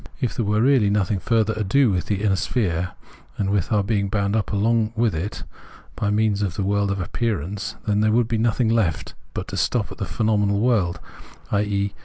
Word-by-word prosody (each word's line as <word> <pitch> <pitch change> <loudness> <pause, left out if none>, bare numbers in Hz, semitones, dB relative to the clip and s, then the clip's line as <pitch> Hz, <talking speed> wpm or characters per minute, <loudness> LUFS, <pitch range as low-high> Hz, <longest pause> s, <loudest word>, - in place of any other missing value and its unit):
If 125 - -1
there 115 - -2
were 105 +2 +2
really 130 -6 +4
nothing 100 -1 +1
further 110 +1 +1
ado 110 +4 +2
with 90 -2 -1
the 100 -1 -1
inner 100 -3 +3
sphere 90 -5 -1 0.4
and 100 -1 0
with 100 -1 0
our 105 -2 +3
being 100 -1 0
bound 100 0 0
up 110 - -1
along 110 +2 +1
with 115 -1 +1
it 85 +6 -4 0.5
by 100 - -1
means 105 -1 +1
of 95 -4 -1
the 100 - -1
world 100 +1 +1
of 100 0 -1
appearance, 100 0 -3
then 105 -1 +1
there 110 0 +3
would 115 0 +2
be 115 -1 -1
nothing 115 +1 +1
left 110 -8 0 0.2
but - - -4
to 95 - -4
stop 100 +6 0
at - - -10
the 100 - -1
phenomenal 105 -3 +1
world, 100 -8 +1 0.5
i.e. 100 -1 0
105 Hz, 205 wpm, -23 LUFS, 100-110 Hz, 0.5 s, really